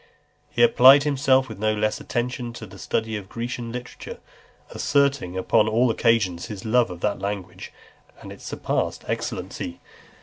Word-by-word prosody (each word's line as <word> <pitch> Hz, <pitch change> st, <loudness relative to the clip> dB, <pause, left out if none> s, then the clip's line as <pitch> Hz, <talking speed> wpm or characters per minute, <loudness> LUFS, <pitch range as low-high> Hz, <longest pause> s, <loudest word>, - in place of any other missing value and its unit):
XLII. 470 Hz, -, -35 dB
He -, -, +4 dB
applied 140 Hz, -, +7 dB
himself 135 Hz, -2 st, +2 dB
with 110 Hz, -3 st, -9 dB
no 110 Hz, 0 st, +1 dB
less 105 Hz, 0 st, -1 dB
attention 120 Hz, 0 st, -3 dB
to 115 Hz, -, -8 dB
the 95 Hz, -, -13 dB
study 110 Hz, 0 st, -2 dB
of 100 Hz, -2 st, -7 dB
Grecian 120 Hz, 0 st, -5 dB
literature, 125 Hz, 0 st, -8 dB, 0.5 s
asserting 140 Hz, -10 st, +1 dB
upon 105 Hz, +3 st, +3 dB
all 115 Hz, +2 st, +3 dB
occasions 110 Hz, -8 st, +1 dB
his 105 Hz, -2 st, -8 dB
love 120 Hz, +1 st, +3 dB
of 90 Hz, -1 st, -9 dB
that 105 Hz, -1 st, -1 dB
language, 100 Hz, -2 st, -5 dB, 0.5 s
and -, -, -10 dB
its -, -, -12 dB
surpassing -, -, -2 dB
excellency. 85 Hz, -, -4 dB
115 Hz, 160 wpm, -24 LUFS, 105-125 Hz, 0.5 s, applied